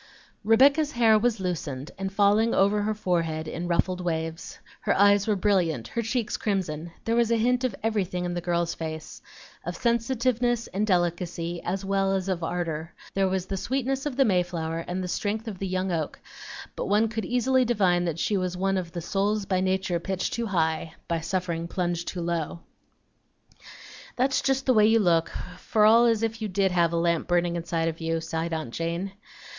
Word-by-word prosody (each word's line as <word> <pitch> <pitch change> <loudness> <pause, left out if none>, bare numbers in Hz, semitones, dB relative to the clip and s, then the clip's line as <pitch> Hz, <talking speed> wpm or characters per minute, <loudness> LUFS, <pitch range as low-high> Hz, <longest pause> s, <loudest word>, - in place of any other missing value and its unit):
Rebecca's 275 +8 +4
hair 225 -3 +5
was 235 -1 +1
loosened 155 -7 -4
and 195 0 -4
falling 205 +3 +3
over 200 +2 +3
her 215 +1 0
forehead 165 -5 -1
in 170 +2 -4
ruffled 180 +1 +1
waves; 165 -1 -3 0.2
her - - 0
eyes 200 +1 +5
were 215 - +2
brilliant, 180 - +1
her 235 - -2
cheeks 230 0 -1
crimson; 170 -6 -2
there 230 - +1
was 235 -1 +3
a 230 - +3
hint 245 +3 +2
of 250 -6 0
everything 190 -5 -1
in 175 - -2
the 175 - -3
girl's 170 -1 0
face, 160 -1 -6 0.4
of - - -4
sensitiveness 240 0 +1
and 205 +3 -2
delicacy 175 -2 -1
as 190 +2 -3
well 195 0 +1
as 190 -1 -1
of 180 -3 -1
ardor; 165 -1 -3 0.2
there 195 -1 +2
was 185 -1 -1
the 195 - -4
sweetness 270 +5 -1
of 280 - -4
the 270 - +5
mayflower 175 -4 0
and 185 +1 -3
the - - -3
strength 215 +5 -2
of 200 -5 -6
the 195 - -2
young 185 0 -1
oak, 160 -3 -2 0.6
but - - -3
one 210 +3 +3
could 220 0 -3
easily 255 +1 +2
divine 190 -7 +2
that 165 -2 -2
she 205 - 0
was 185 -1 -1
one 195 +1 +1
of 170 -2 -7
"The 170 - -4
souls 200 +4 0
by 185 -1 0
nature 185 -2 0
pitched 185 +2 -2
too 235 -1 -2
high, 160 -3 -1
By 170 -1 0
suffering 170 -1 -2
plunged 175 -1 -2
too 180 - -4
low." 170 -1 -2 1.5
"That's 265 +2 +2
just 270 0 0
the 255 - +4
way 215 -2 +5
you 225 +1 +5
look, 170 -6 +3 0.3
for 215 -1 +2
all 225 +2 +7
the 240 - +5
world 235 - +5
as 225 0 -3
if 225 0 -2
you 215 - -1
did 195 -1 +1
have 170 -2 +2
a 170 - 0
lamp 170 0 +1
burning 175 -1 +1
inside 165 -1 -1
of 165 0 -4
you," 165 0 0
sighed 165 +1 -3
aunt 155 -7 -4
Jane. 170 +4 -2
185 Hz, 200 wpm, -26 LUFS, 170-220 Hz, 1.5 s, all